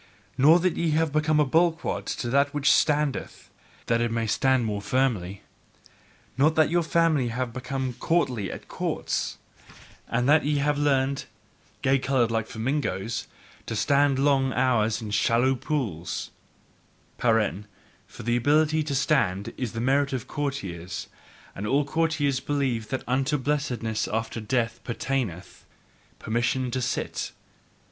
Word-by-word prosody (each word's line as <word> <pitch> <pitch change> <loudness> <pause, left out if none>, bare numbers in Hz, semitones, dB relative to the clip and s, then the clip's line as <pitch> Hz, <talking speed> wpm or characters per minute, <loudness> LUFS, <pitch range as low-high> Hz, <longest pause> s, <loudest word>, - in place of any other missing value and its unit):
nor 145 +6 +6
that 180 0 +1
ye 170 - +1
have 160 0 +1
become 155 0 +2
a 150 - +4
bulwark 165 +4 +1
to 120 - -3
that 140 +4 +2
which 145 -1 +3
standeth, 150 -2 0 0.3
that 115 0 +1
it 120 -1 0
may 115 0 -1
stand 130 +2 +2
more 105 -2 -2
firmly. 100 -7 -1 1.0
Not 155 +3 +4
that 155 -1 +3
your 175 0 +3
family 160 -5 +2
have 120 0 -3
become 130 0 -3
courtly 125 - 0
at - - -9
courts, - - -2 0.7
and 120 +2 0
that 150 +2 +5
ye 145 +1 +1
have 145 +1 +1
learned 135 -1 +1 0.6
gay 135 0 +3
coloured, 125 -3 +1
like 115 -1 -1
the - - -11
flamingo 115 -4 -1 0.6
to 115 - -3
stand 140 +3 +3
long 135 -1 +2
hours 115 -3 +1
in 105 - -6
shallow 120 +5 +3
pools: 110 - -3 0.9
(For 115 -2 +3 0.8
ABILITY 150 +7 +2
to 140 -2 -2
stand 110 -9 +1
is 120 -3 -4
a - - -2
merit 140 +3 +1
in 130 - 0
courtiers; 95 - -5 0.4
and 105 - -5
all 140 +5 +2
courtiers 155 -3 0
believe 130 -6 -1
that 130 - -3
unto 135 +4 +1
blessedness 130 -6 -1
after 115 +1 -3
death 115 +1 -1
pertaineth 120 -7 -3 0.5
PERMISSION 120 +3 -1
to 130 - -1
sit!) - - -3
130 Hz, 140 wpm, -26 LUFS, 115-145 Hz, 1.0 s, nor